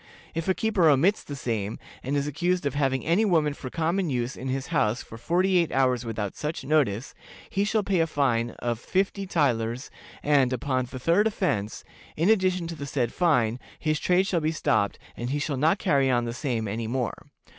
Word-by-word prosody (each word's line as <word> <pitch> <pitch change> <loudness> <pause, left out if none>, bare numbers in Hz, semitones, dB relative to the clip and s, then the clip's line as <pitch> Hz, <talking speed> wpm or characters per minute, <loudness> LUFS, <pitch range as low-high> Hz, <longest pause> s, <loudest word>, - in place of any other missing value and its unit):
If 165 +1 -3
a 190 - +2
keeper 210 -7 +3
omits 165 +9 +3
the 145 - -7
same, 110 -5 -3 0.2
and 140 +3 -1
is 140 - 0
accused 175 +3 0
of 140 - 0
having 135 -2 0
any 170 +7 +3
woman 160 -8 +2
for 130 -2 -7
common 170 +4 0
use 125 -1 -2
in 130 - -6
his 130 +2 -3
house 115 -5 +1
for - - -11
forty 180 +10 +2
eight 170 - 0
hours 130 -2 +2
without 110 -4 -4
such 150 0 -4
notice, 135 -5 +1 0.4
he 200 - +1
shall 215 0 +1
pay 195 -2 +1
a 165 - +3
fine 120 -6 +1
of 120 -2 -2
fifty 195 - -1
thalers, 125 -7 0 0.3
and, 140 -4 +3
upon 130 0 -1
the 130 - -8
third 170 - +3
offense, 115 - -2 0.3
in 170 +7 +4
addition 185 -4 +2
to 165 0 -5
the 140 -2 -6
said 130 -5 -1
fine, 125 -9 +2 0.2
his 155 -1 0
trade 180 +1 +3
shall 175 -3 0
be 155 +1 +1
stopped, 110 -9 +1 0.2
and 120 +1 -4
he 145 - 0
shall 145 0 -2
not 155 +8 +3
carry 140 -7 +2
on 120 -2 +2
the 115 - -3
same 120 -4 -2
any 110 +3 -3
more. 125 0 -1
145 Hz, 205 wpm, -26 LUFS, 120-170 Hz, 0.4 s, in